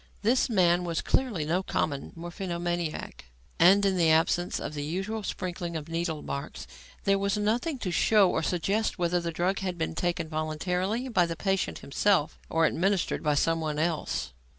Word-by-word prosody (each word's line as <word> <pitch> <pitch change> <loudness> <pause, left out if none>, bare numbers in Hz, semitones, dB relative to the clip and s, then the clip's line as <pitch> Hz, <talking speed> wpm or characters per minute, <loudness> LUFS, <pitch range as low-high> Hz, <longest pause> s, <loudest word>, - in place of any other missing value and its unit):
This 245 +5 +3
man 180 -4 +3
was 170 -2 -2
clearly 215 - 0
no 170 +5 +1
common 155 -6 -2
morphinomaniac; 175 - -4 0.3
and 195 +4 +6
in 190 -1 +2
the 165 -2 +4
absence 165 +2 +2
of - - -5
the 145 - -4
usual 195 +8 -3
sprinkling 175 -3 -4
of 150 - -6
needlemarks, 160 -4 -4 0.4
there 195 0 +3
was 200 0 0
nothing 235 +9 0
to 195 -7 -3
show 205 +2 +4
or 160 - 0
suggest 195 +7 0
whether 175 0 +1
the 170 0 -3
drug 180 +4 0
had 185 -2 -3
been 165 0 -2
taken 170 -1 -1
voluntarily 180 +9 -2
by 180 -8 +2
the 165 - -3
patient 195 +1 -1
himself 165 +2 +1
or 165 0 +3
administered 190 +4 +1
by 150 -1 +1
someone 160 0 0
else. 160 - -1
175 Hz, 165 wpm, -28 LUFS, 160-195 Hz, 0.4 s, and